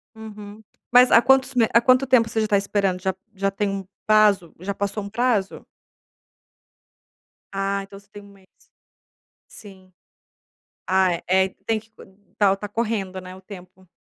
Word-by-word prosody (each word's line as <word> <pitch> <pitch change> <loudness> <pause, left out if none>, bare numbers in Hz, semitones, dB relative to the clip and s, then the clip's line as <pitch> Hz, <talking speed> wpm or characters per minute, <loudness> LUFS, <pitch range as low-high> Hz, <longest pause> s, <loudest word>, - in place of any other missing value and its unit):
Uhum. 215 -1 -11 0.3
Mas 250 0 +6
há 230 - +7
quantos 265 +1 +3
me 230 -3 +3
Há 235 - +6
quanto 255 +2 +3
tempo 240 -3 +4
você 220 -1 -1
já 215 - 0
tá 205 -1 +2
esperando? 195 -2 -1
Já 190 -1 -1 0.2
já 195 +1 -1
tem 205 +1 -2
um 195 -1 -5 0.2
prazo? 210 -5 +3
Já 200 +2 -4
passou 200 +1 -4
um 200 - -7
prazo? 220 -4 -1 1.9
Ah, 195 0 -2
então 195 0 -13
você 200 - -25
tem 205 0 -12
1 - - -16
mês? 195 -1 -21 1.1
Sim. 190 -3 -14 1.0
Ah, 185 -1 +2
é, 170 - -6
é. 190 +1 +2 0.2
Tem 225 -1 0
que 220 - -23
co - - -16 0.3
tá 200 -2 +4
o - - +1
tá 210 - -6
correndo, 205 -4 -3
né, 185 0 -10
o 190 - -15
tempo. 185 -1 -14
200 Hz, 175 wpm, -22 LUFS, 190-220 Hz, 1.9 s, há